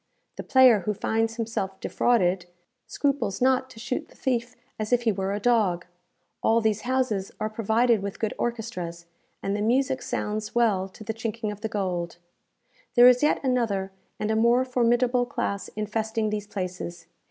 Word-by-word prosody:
The - - -5
player 260 -5 +6
who 210 +3 -2
finds 225 +2 0
himself 220 -4 -3
defrauded, 185 -7 +1 0.4
scruples 280 -9 -1
not 260 0 +2
to 245 -3 -13
shoot 245 +2 -3
the - - -19
thief 245 -1 -1 0.2
as 215 +1 -3
if 245 -1 +3
he 225 - +3
were 195 -1 -2
a 205 - -1
dog. 205 -6 +2 0.6
All 225 +1 +3
these 220 -2 +1
houses 245 -6 -1
are 215 0 -2
provided 225 +1 +2
with 200 0 -5
good 220 - -2
orchestras, 180 -8 -4 0.4
and 195 +1 -1
the 205 - -2
music 260 +4 +1
sounds 215 +2 -3
well 205 -5 +2
to 205 - -12
the 220 - -3
chinking 225 -1 -3
of 205 0 -9
the 220 - -2
gold. 180 -5 -2 0.8
There 245 0 +9
is 250 0 +6
yet 300 - +2
another 225 -7 0 0.3
and 215 +1 -1
a - - +1
more 235 +3 +4
formidable 245 0 +2
class 200 -4 -3
infesting 215 +1 -1
these 210 -1 -3
places. 180 -4 -5
220 Hz, 170 wpm, -26 LUFS, 200-240 Hz, 0.8 s, There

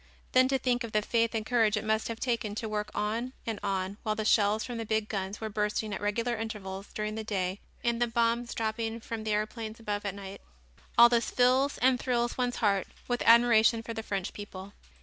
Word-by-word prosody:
Then 255 0 +5
to 270 0 +2
think 245 -1 0
of 230 - -7
the 210 0 +2
faith 230 +1 +1
and 220 -1 -1
courage 225 -3 +3
it 215 - -2
must 220 0 +1
have 230 -1 -5
taken 230 -4 -1
to 225 - -3
work 210 -1 -2
on 230 +5 -2
and 225 -2 -3
on 195 -1 -2
while 215 -1 -1
the 215 0 -3
shells 215 0 +3
from 240 -2 -5
the - - -2
big 220 -1 0
guns 195 -1 -3
were 220 - -3
bursting 210 0 -1
at - - -4
regular 230 +4 0
intervals 205 -3 -5
during 215 0 -3
the 220 0 -4
day 190 -2 -2 0.2
and 235 0 0
the 240 - +3
bombs 235 0 0
dropping 225 +1 -2
from 225 -1 -5
the 215 - -1
aeroplanes 215 +1 -3
above 205 -2 -3
at 200 -1 -3
night; 195 0 -8 0.6
all 235 0 +10
this 235 -1 +1
fills 255 +3 +3
and 255 0 +3
thrills 240 -2 0
one's 245 -1 -1
heart 200 -3 +1 0.2
with 245 0 -1
admiration 230 -1 +6
for 230 - -5
the 225 - -4
French 195 -4 -3
people. 200 -1 -9
220 Hz, 220 wpm, -29 LUFS, 210-235 Hz, 0.6 s, all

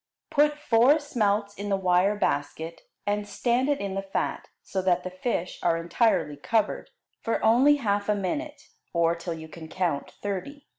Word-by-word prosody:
Put 295 -1 +3
four 260 0 +4
smelts 210 -8 0
in 205 0 -5
the 195 - +2
wire 185 +2 +3
basket, 160 -2 -2 0.2
and 205 0 -1
stand 240 +6 0
it 285 - +1
in 200 -1 -3
the 195 - -2
fat, 195 0 -3 0.2
so 190 - -2
that 180 -1 +2
the 185 - -5
fish 185 -2 -3
are 170 -1 +2
entirely 165 -3 +1
covered, 215 +9 0 0.3
for 230 - -1
only 260 +6 +6
half 205 -6 -1
a 210 - +3
minute, 290 - -3 0.3
or 170 -1 +3
till 170 0 -5
you 160 0 -9
can 160 0 -10
count 165 -5 -1
thirty. 205 +9 -6
200 Hz, 170 wpm, -26 LUFS, 180-240 Hz, 0.3 s, only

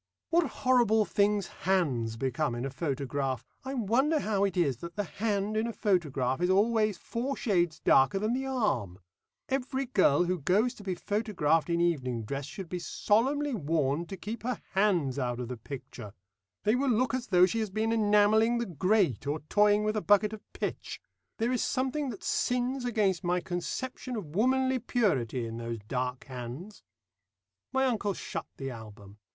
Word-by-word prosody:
What 335 -2 +3 0.2
horrible 235 -4 +4
things 200 +1 +2
hands 140 -14 -1
become 130 +1 -1
in 120 +2 -3
a 135 - -3
photograph! 135 -3 -2 0.2
I 265 +1 -4
wonder 260 +7 +2
how 205 -2 0
it 195 -3 0
is 140 -8 +2
that 170 +6 -8
the 205 - -1
hand 205 +3 -2
in 220 +2 +1
a - - -2
photograph 150 - 0
is 180 - +2
always 215 +1 +3
four 255 +9 -3
shades 175 -7 +1
darker 135 +8 +4
than 215 +4 0
the 265 +1 -2
arm. 170 - -1 0.5
Every 265 0 -1
girl 185 - +3
who 180 0 -1
goes 205 - +2
to 210 - -13
be 190 -2 -2
photographed 175 -8 0
in 170 0 +1
evening 130 -9 0
dress 135 +5 -4
should 190 +3 -7
be 180 +1 -4
solemnly 270 +11 +1
warned 155 - 0
to 195 - -6
keep 215 +5 -6
her 250 +2 -2
hands 175 -10 +2
out 120 -2 -2
of 125 -1 -4
the 125 - -3
picture. 115 -4 -9 0.5
They 210 - +3
will 265 +2 +1
look 245 +1 +2
as 255 -1 -2
though 180 -2 +6
she 210 +5 -1
has 215 -2 -1
been 215 +3 -1
enamelling 215 +2 +4
the 235 - -1
grate, 180 - +1
or 150 +2 -1
toying 210 0 +4
with 215 0 0
a 215 - 0
bucket 205 +1 +3
of 215 - -7
pitch. - - -4 0.4
There 230 +2 0
is 250 - 0
something 265 +2 -1
that 215 -6 -8
sins 250 +1 0
against 205 -6 +1
my 180 0 +1
conception 250 +9 -4
of 170 -8 -6
womanly 260 +4 +2
purity 135 - 0
in 115 0 -6
those 115 0 -4
dark 125 0 -2
hands." 130 - -8 0.9
My 265 0 +2
uncle 210 -6 0
shut - - -5
the 135 -1 -4
album. 105 -3 -11
195 Hz, 180 wpm, -29 LUFS, 145-230 Hz, 0.9 s, though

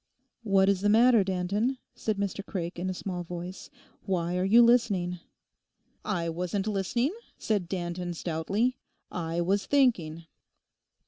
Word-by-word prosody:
'What 195 -3 +3
is 195 -1 +2
the 205 - +2
matter, 230 0 +6
Danton?' 200 +7 -1 0.2
said 215 -2 -2
Mr 200 0 -2
Craik 175 -3 -5
in 185 +2 -2
a - - -1
small 180 -1 -4
voice; 175 +2 -7 0.3
'why 175 -2 -1
are 180 - +1
you 225 +5 +6
listening?' 205 -7 +2 0.8
'I 175 -6 -1
wasn't 180 +4 -2
listening,' 215 - 0 0.2
said 200 -6 -1
Danton 175 -1 -3
stoutly, 195 +10 -1 0.3
'I 170 0 -2
was 195 +4 0
thinking. 175 - +2
190 Hz, 135 wpm, -28 LUFS, 175-215 Hz, 0.8 s, matter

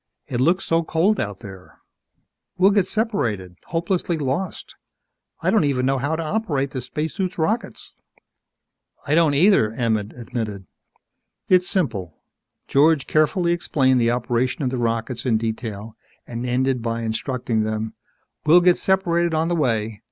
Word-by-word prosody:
"It 125 -1 -2
looks 175 +7 +2
so 165 0 +2
cold 170 +6 +1
out 105 -4 -4
there. 95 -4 -12 0.8
We'll 190 +2 +5
get 200 -3 +2
separated 120 - -1
hopelessly 170 0 -1
lost. 145 +6 -3 0.7
I - - +2
don't 220 - +3
even 135 -3 +1
know 135 0 +1
how 145 +4 -1
to 165 - -3
operate 155 -7 -1
the 130 - -4
spacesuit's 160 - -3
rockets!" 215 +9 -2 1.1
"I 145 - 0
don't 160 -3 +4
either," 160 - +4
Emmett 110 -3 -1
admitted. 115 -5 -5 0.8
"It's 180 0 +4
simple." 100 - -1 0.5
George 145 0 +3
carefully 170 +3 +2
explained 130 -7 +2
the 115 - +3
operation 125 +3 -1
of 130 - 0
the 130 - -2
rockets 115 +1 -2
in 120 -4 +2
detail 110 -1 -5 0.3
and 120 +1 -5
ended 130 0 0
by 115 0 -2
instructing 115 0 -1
them, 110 0 -2 0.5
"We'll 170 +4 +6
get 180 0 +4
separated 170 -3 +1
on 160 +2 +1
the 175 - +1
way. 115 -8 -1
135 Hz, 145 wpm, -22 LUFS, 115-170 Hz, 1.1 s, We'll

